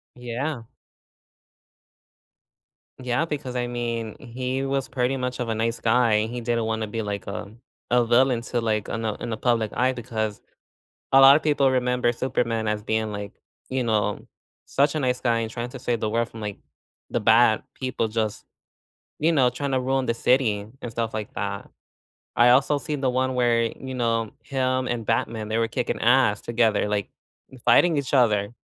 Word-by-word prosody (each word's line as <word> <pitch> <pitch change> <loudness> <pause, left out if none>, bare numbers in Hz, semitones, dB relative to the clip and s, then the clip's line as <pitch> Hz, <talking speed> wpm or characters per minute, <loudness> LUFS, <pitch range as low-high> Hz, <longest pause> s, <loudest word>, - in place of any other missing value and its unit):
Yeah. 125 +2 -4 2.3
Yeah, 125 +4 -1
because 140 -5 -5
I 120 -1 -1
mean, 115 -2 -3
he 130 +1 -3
was 135 -1 -1
pretty 130 0 0
much 125 -1 -3
of 125 - -2
a 110 - 0
nice 115 +1 -1
guy, 115 -2 +3
he 120 +2 -5
didn't 115 -1 0
wanna 110 -1 -2
be 115 +2 -3
like, 100 -2 -4
uh, 100 - -4 0.5
a 120 -1 +4
villain 120 +1 +3
to 120 0 -2
like 110 -2 -1
in 115 - -3
the 110 -2 -1
in - - -6
the 110 - -2
public 115 -3 +1
eye 130 +1 +2
because 110 -4 -4 0.7
a 135 - +8
lot 135 +1 +9
of 155 - -1
people 145 -3 +3
remember 125 -1 +1
Superman 115 -3 -1
as 105 0 -1
being 110 0 -1
like, 100 -1 -6 0.4
you 130 0 0
know, 105 -3 -1 0.4
such 140 +2 +2
a 155 - -1
nice 125 -2 0
guy 120 -2 +1
and 115 -1 -3
trying 120 +1 -5
to 130 - -8
save 120 -1 -1
the 110 - 0
world 115 +1 0
from, 115 - -11
like, 105 -2 -4 0.5
the - - 0
bad - - +5
people, 130 -3 -2
just, 110 -1 -2 0.7
you 160 +3 +2
know, 130 -5 +4
trying 135 +3 -4
to 130 - +2
ruin 130 0 0
the 115 - +1
city 115 -4 +1
and 120 - -6
stuff 115 0 -2
like 110 -1 -5
that. 100 -1 -4 0.7
I 120 +1 +6
also 140 +3 +4
seen 150 0 -4
the 130 - +2
one 130 +1 0
where, 120 -2 +2
you 130 +3 -5
know, 115 -3 0
him 130 -1 -1
and 120 -2 -2
Batman, 110 -1 -1
they 110 +1 0
were 115 0 +1
kicking 125 - -2
ass 120 -3 +4
together, 115 -3 +1
like, 105 -2 -2 0.6
fighting 170 -4 +5
each 140 0 -2
other, 105 -4 +2
120 Hz, 185 wpm, -24 LUFS, 110-130 Hz, 2.3 s, lot